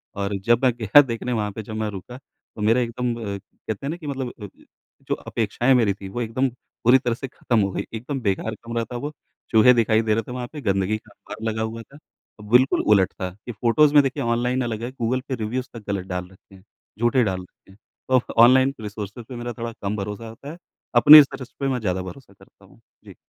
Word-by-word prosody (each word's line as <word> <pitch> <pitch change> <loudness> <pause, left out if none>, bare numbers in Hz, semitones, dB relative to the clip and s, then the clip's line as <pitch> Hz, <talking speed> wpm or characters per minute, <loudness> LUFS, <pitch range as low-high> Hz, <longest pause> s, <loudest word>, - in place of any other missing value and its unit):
और 100 0 -2
जब 120 +2 +3
मैं 125 - +5
गया 115 +6 +7
देखने 125 -2 -4
वहाँ 105 -2 -1
पे 110 +3 -7
जब 110 +1 -8
मैं 110 -1 -2
रुका 105 +5 -8
तो 120 -4 -16
मेरा 115 +4 +3
एकदम 120 +1 -2
कहते 105 +2 -7
हैं - - -2
ना 165 - -4
कि 155 -4 -9
मतलब 130 -3 -3
अ, - - -5 0.6
जो - - 0
अपेक्षाएँ 120 +4 0
मेरी 110 -5 +3
थीं 95 -1 -10
वो 120 +5 -4
एकदम 120 +4 0
पूरी 125 +1 +1
तरह 120 -2 -1
से 135 - -6
खत्म 120 -2 -1
हो 100 -1 0
गईं। - - -3
एकदम 130 +5 -4
बेकार 110 +1 -1
कमरा 115 0 -2
था 120 +2 -6
वो, 145 +4 -4 0.4
चूहे 115 +2 +6
दिखाई 110 -2 +3
दे 110 -1 +1
रहे 115 +1 0
थे, 125 - -10
वहाँ 125 -1 -5
पे 150 - -7
गंदगी 95 +1 0
का 110 -1 -20
अंबार 110 +2 -11
लगा 110 0 -3
हुआ 110 +1 -4
था। 140 +5 -16 0.5
बिल्कुल 125 +2 +4
उलट 95 -2 +2
था 95 - -4 0.2
कि 120 - -5
फ़ोटोज़ 125 +7 +3
में 145 - +8
देखिए 135 -3 -2
ऑनलाइन 120 +2 0
अलग 115 -1 -4
है, 120 - -4
गूगल 130 0 -1
पे 130 - -2
रिव्यूज़ 125 +4 -3
तक 115 -3 -9
ग़लत 95 -2 -3
डाल 90 -1 -4
रखे 95 +1 -20
हैं, 95 - -18 0.4
झूठे 120 +1 +3
डाल 95 -3 -2
रखे 90 +1 -19
हैं। 95 - -19 0.3
तो 130 -1 +4 0.2
ऑनलाइन 130 +2 +5
रिसोर्सेज़ 105 +2 -7
पे 125 - -7
मेरा 120 0 -5
थोड़ा 115 0 -4
कम 100 +1 -2
भरोसा 105 +3 -5
होता 140 +6 -10
है, 170 - -10 0.4
अपनी 145 +6 +11
रिसर्च 135 -3 0
पे 135 - -1
मैं 130 -2 0
ज़्यादा 95 -4 -1
भरोसा 100 +3 -10
करता - - -21
हूँ। - - -21 0.3
जी। - - -13
115 Hz, 230 wpm, -23 LUFS, 105-125 Hz, 0.6 s, अपनी